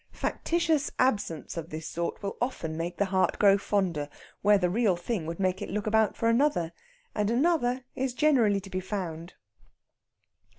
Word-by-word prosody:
Factitious 330 -4 0
absence 205 - 0
of 165 0 -5
this 155 0 -6
sort 170 +4 -4
will 200 - -3
often 170 -11 -2
make 170 +2 -4
the 200 - +2
heart 190 -1 +1
grow 200 -2 +6
fonder, 185 -7 -1 0.3
where 205 +1 +5
the 180 -2 +1
real 200 0 +2
thing 175 -1 -3
would 165 +2 -5
make 185 -1 0
it - - -4
look 210 +2 -2
about 220 0 +2
for 230 - 0
another; 230 - +2 0.4
and 210 -1 0
another 255 -1 +1
is 260 -1 -2
generally 245 -10 +3
to 195 0 -12
be 185 - -1
found. 180 -3 -5
200 Hz, 170 wpm, -28 LUFS, 175-240 Hz, 0.4 s, grow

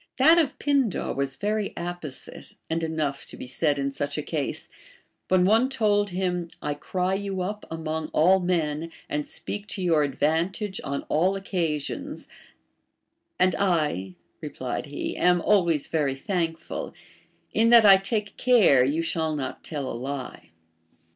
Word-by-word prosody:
That 320 +6 +7
of 305 -6 0
Pindar 275 -8 +1
was 140 -1 -2
very 210 0 -1
apposite, 170 -5 -7 0.2
and 165 +1 0
enough 155 -4 -2
to - - -11
be - - -7
said 145 +3 0
in 140 0 -1
such 145 +2 -3
a 150 - -2
case: 150 -3 -3 0.6
Avhen 185 -1 +4
one 225 +6 +4
told 210 -6 +2
him, 180 -2 -2
I 150 - -2
cry 180 +5 -2
you 195 -1 -2
up 210 +3 -5
among 160 -1 -3
all 185 +5 +4
men, 165 -3 -1 0.2
and 150 0 -2
speak 205 0 -6
to 195 -3 -4
your 165 -4 +3
adA^antage 170 - -1
on 140 0 -3
all 185 +5 +1
occa 170 -6 -1
sions; 140 - -7 1.1
and 185 0 +3
I, 150 - 0 0.3
replied - - -4
he, - - -4
am 180 0 +3
always 170 -6 +2
very 145 -4 0
thankful, 165 +1 -3 0.6
in 225 +1 +4
that 235 -2 +8
I 195 -1 +9
take 205 +1 -3
care 215 - +5
you 150 +6 0
shall 160 -1 -1
not 140 -3 -5
tell 145 -4 -4
a - - -4
lie. 130 -7 -6
170 Hz, 155 wpm, -26 LUFS, 150-195 Hz, 1.1 s, I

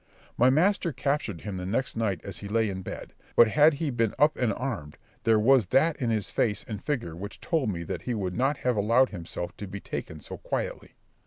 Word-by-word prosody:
My 125 +2 +5
master 175 +5 +3
captured 130 - -2
him 100 -3 -5
the 90 - -4
next 130 +7 -1
night 105 -7 -1
as 100 - -7
he 100 - -7
lay 110 +1 +1
in 95 0 -5
bed; - - -7 0.2
but 115 - +7
had 150 +5 +5
he 150 0 -2
been 115 -3 0
up 150 +2 +4
and 125 -4 +1
armed, 105 - -4 0.3
there 115 -1 +5
was 115 -1 +4
that 155 - +3
in 120 - +1
his 110 -5 -1
face 105 -3 0
and 105 -3 -6
figure 115 - -2
which 100 +5 -8
told 160 -9 0
me 85 -4 -3
that - - -4
he 125 - -2
would 95 -4 -2
not 135 +4 +1
have 125 -2 0
allowed 115 +5 +4
himself 85 -1 -6
to 105 - -6
be 100 +2 -6
taken 80 -4 -6
so - - -8
quietly. - - -4
115 Hz, 225 wpm, -27 LUFS, 100-135 Hz, 0.3 s, but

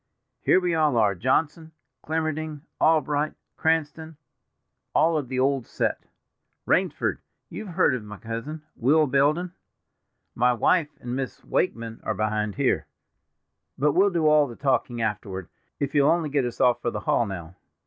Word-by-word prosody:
Here - - +4
we 180 -2 0
all 155 -6 +2
are, 105 -3 +4
Johnson, 155 - 0 0.3
Clemmerding, 155 -1 -2 0.2
Albright, 150 -1 +2 0.2
Cranston—all 160 0 -2
of 145 -4 -1
the 130 0 -2
old 135 -2 +1
set. - - -2 0.6
Rainsford, - - +1 0.3
you've 215 - -7
heard 165 - +4
of 125 -4 -3
my 105 0 -9
cousin, 115 +9 -6
Will 150 +6 +3
Belden. 150 +6 +1 0.8
My 125 +1 +3
wife 150 +6 +2
and 120 0 -5
Miss 130 -1 -5
Wakeman 115 -9 -1
are - - -2
behind 105 -1 -1
here; - - +1 0.9
but 150 +2 +3
we'll 195 +6 +4
do 170 -4 0
all 150 -1 +5
the 120 - -9
talking 125 -3 0
afterward, 100 -4 -4 0.3
if 140 - -2
you'll 145 -1 +4
only 165 -3 +1
get 140 -2 +1
us 120 - -5
off 125 -2 +3
for - - 0
the 110 -2 -5
hall 115 - +1
now." 90 -3 -7
140 Hz, 150 wpm, -25 LUFS, 115-155 Hz, 0.9 s, all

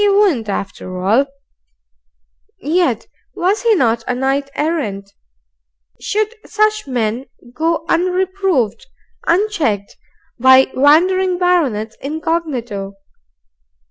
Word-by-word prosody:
He 410 - +4
wouldn't 380 - +2
after 190 -2 -5
all. 220 +9 +2 1.3
Yet 340 +5 0 0.3
was 380 +4 +1
he 465 -3 +3
not 230 - +1
a 250 - 0
Knight 270 +2 -1
Errant? 215 -12 -2 0.9
Should 430 +2 -1
such 430 -3 0
men 245 0 -2 0.3
go 325 +3 -1
unreproved, 360 - 0 0.4
unchecked, 330 - 0 0.4
by 260 +1 +6
wandering 360 +7 +3
baronets 280 - +1
incognito? 275 - -3
295 Hz, 90 wpm, -17 LUFS, 230-365 Hz, 1.3 s, by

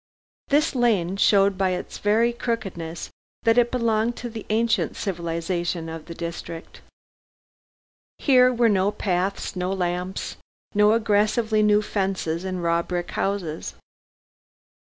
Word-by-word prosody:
This 295 +3 +2
lane 210 -8 +2
showed 195 -1 +3
by 190 -1 +2
its - - -8
very 225 +3 +2
crookedness 185 -9 -4 0.3
that 230 +1 +4
it 240 0 +3
belonged 230 -1 +1
to 240 -1 -6
the 220 -1 -8
ancient 225 +1 +1
civilization 170 -2 -3
of 160 -1 -7
the 170 - -7
district. 170 0 -7 1.4
Here 255 -3 +5
were 240 -1 +3
no 200 -2 +3
paths, 190 0 -2
no 180 +1 -2
lamps, 180 0 -3 0.4
no 210 +1 +5
aggressively 215 0 +2
new 210 0 +4
fences 190 -5 -2
and 185 -2 -3
raw 170 0 +2
brick 175 0 -4
houses. 185 -6 -3
195 Hz, 125 wpm, -24 LUFS, 175-225 Hz, 1.4 s, Here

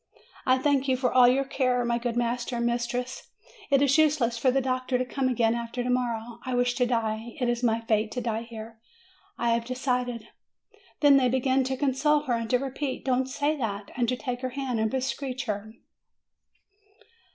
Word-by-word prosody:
I 255 0 +5
thank 275 0 +1
you 260 -1 +2
for 250 -1 0
all 250 -1 +7
your 260 +2 +3
care, 255 -2 0
my 235 0 0
good 240 -1 -2
master 240 +1 -1
and 235 0 -1
mis 240 0 0
tress. 250 +1 -4 0.4
It 280 -1 +4
is 275 +2 +4
useless 285 -7 +3
for 245 +3 +2
the 265 +2 +2
doctor 255 0 -1
to 255 - -1
come 265 +1 -1
again 230 -3 +2
after 235 +1 -3
to 250 - -3
morrow. 235 -2 -2
I 255 -1 -2
wish 245 0 +2
to 250 - +2
die. 225 -1 -2
It 250 - 0
is 240 0 0
my 230 -2 +1
fate 220 -1 0
to 250 - -2
die 225 -1 -2
here. 225 -1 -9 0.6
I 235 0 +1
have 230 0 +1
decided." 250 -2 -2 0.7
Then 285 -2 +7
they 255 -2 +3
began 260 +1 +2
again - - +3
to 265 0 -2
console 290 +2 +2
her, 265 -5 -2
and 230 -1 -2
to 250 - +4
repeat, 270 +1 -4
"Don't 260 0 +1
say 290 +3 0
that," 205 -5 -4
and 240 -2 +1
to 250 - +1
take 250 -1 -4
her 255 - -2
hand 260 -4 -1
and 220 0 +1
be 265 - -1
seech 265 -1 -3
her. 210 -1 -4
250 Hz, 210 wpm, -27 LUFS, 235-260 Hz, 0.7 s, all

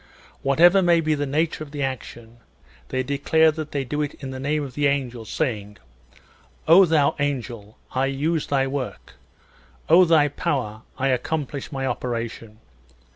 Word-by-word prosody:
Whatever 170 +8 +5
may 175 -2 +4
be 155 -1 +1
the 145 -1 -2
nature 155 +4 0
^ - - -10
of - - -15
the 145 -1 -4
action, 120 -3 -6 0.5
they 130 0 -1
declare 150 +4 +3
that 155 -1 -6
they 140 -2 -1
do 150 +4 -3
it 145 - -3
in 135 -2 -8
the 130 - -6
name 150 +2 -1
of 135 -3 -7
the 145 +2 +1
angel, 125 -5 -2
saying, 105 -6 -3 0.9
"O 180 +4 +8
thou 155 -4 +2
angel, 120 -7 -4
I 130 +1 0
use 150 +4 -1
thy 135 -1 +1
work; 135 -1 -5 0.8
O 175 +3 +8
thou 160 -4 +4
power, 130 -9 -3 0.2
I 135 +1 0
accomplish 140 +2 -2
thy 135 -2 -3
operation!" 115 -3 -4
140 Hz, 165 wpm, -23 LUFS, 130-155 Hz, 0.9 s, O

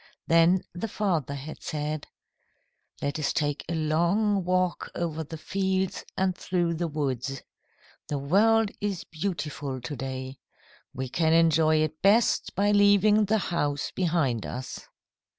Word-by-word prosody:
Then 165 +3 +4
the 180 +6 -4
father 175 - -1
had 145 +3 -8
said: 150 -1 -3 1.0
"Let 145 +2 -1
us 150 - 0
take 145 -1 -1
a 170 - -1
long 175 +6 +1
walk 185 0 0
over 160 -2 -2
the 160 +2 -8
fields 190 +2 -1
and 185 -1 +1
through 175 -2 -1
the 170 +1 -2
woods. 135 -3 -3 0.6
The 145 - -2
world 205 +9 +3
is 200 -4 -2
beautiful 150 -6 -4
to 135 +4 -6
day. 130 0 -6 0.5
We 130 +1 -4
can 160 +5 +1
enjoy 160 -1 +4
it 155 0 -4
best 215 +4 +3
by 205 +1 +2
leaving 205 +1 +5
the 220 +2 +2 0.2
house 145 -3 -1
behind 160 - 0
us." 130 +1 -7
165 Hz, 135 wpm, -27 LUFS, 145-190 Hz, 1.0 s, leaving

